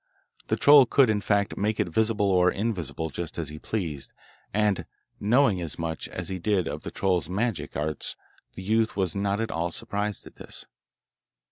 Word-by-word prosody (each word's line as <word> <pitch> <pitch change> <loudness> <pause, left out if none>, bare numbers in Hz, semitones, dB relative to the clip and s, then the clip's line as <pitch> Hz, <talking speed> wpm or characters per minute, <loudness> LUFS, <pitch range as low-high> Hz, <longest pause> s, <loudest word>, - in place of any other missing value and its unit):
The - - +1
troll 145 -3 +7
could, 130 -4 +4
in 105 -1 0
fact, 100 -1 +1
make 105 +2 0
it - - +2
visible 110 +4 +1
or 90 -1 +5
invisible, 85 -7 -2
just 85 +3 -5
as 80 -4 -2
he 75 +1 -8
pleased, 80 -11 -3 0.4
and, 105 -2 +1 0.3
knowing 110 -3 +3
as 85 -3 -4
much 80 -1 -3
as - - -5
he 95 -1 -3
did 95 -2 +1
of - - -4
the - - -6
troll's 90 -4 0
magic 95 -6 -2
arts, 75 -1 -2 0.4
the 95 - -7
youth 110 +3 +1
was 95 -3 0
not 100 +1 0
at 115 - -2
all 85 +1 -1
surprised 105 +1 -3
at - - -14
this. - - -9
100 Hz, 180 wpm, -26 LUFS, 85-110 Hz, 0.4 s, troll